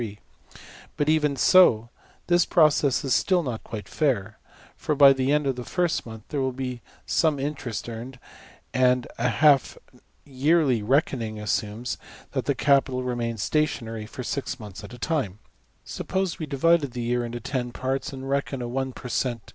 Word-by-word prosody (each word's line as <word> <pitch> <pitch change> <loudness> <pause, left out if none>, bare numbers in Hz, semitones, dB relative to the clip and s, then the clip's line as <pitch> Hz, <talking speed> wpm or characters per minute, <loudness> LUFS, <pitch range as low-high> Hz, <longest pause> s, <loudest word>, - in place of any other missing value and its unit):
\] - - -18
But, 145 0 +1
even 150 -2 +2
so, 125 - +5 0.4
the 175 -1 +4
process 150 -4 +3
is 135 - +1
still 185 -3 +2
not 120 -6 -4
quite 110 -2 -7
fair; 110 -8 -1 0.4
for, 150 - -2
by 140 -1 +8
the 130 +1 0
end 150 0 +2
of 135 -2 0
the 125 - -4
first 175 -2 -1
month, 110 -2 -9
there 145 -3 -2
will 130 0 0
be 125 -1 -5 0.2
some 155 -3 +2
interest 135 -6 -4
earned; 120 +3 -7 0.6
and 125 -1 +3
a 120 +1 +2
half 140 +1 +3 0.5
yearly 140 -2 +2
reckoning 115 -2 0
assumes 105 +3 -2 0.3
that - - -2
the - - +1
capital 135 -2 +2
remains 115 -3 -2
stationary 115 -8 -1
for 125 - -7
six 135 +1 -3
months 105 -2 -9
at 100 - -9
\DPPageSep{149.png}% 125 - -11
a - - -19 0.3
time. 95 +3 -17 0.5
Suppose 190 -2 -3
we 155 - -4
divided 145 -1 +2
the 125 - -4
year 120 +1 0
into 120 0 -5
$10$~parts, 130 +2 -3
and 135 -1 -7
reckon 135 -1 -1
a - - -3
one 130 +1 -3
per 125 - -9
cent. 120 -2 -1
130 Hz, 170 wpm, -25 LUFS, 120-145 Hz, 0.6 s, by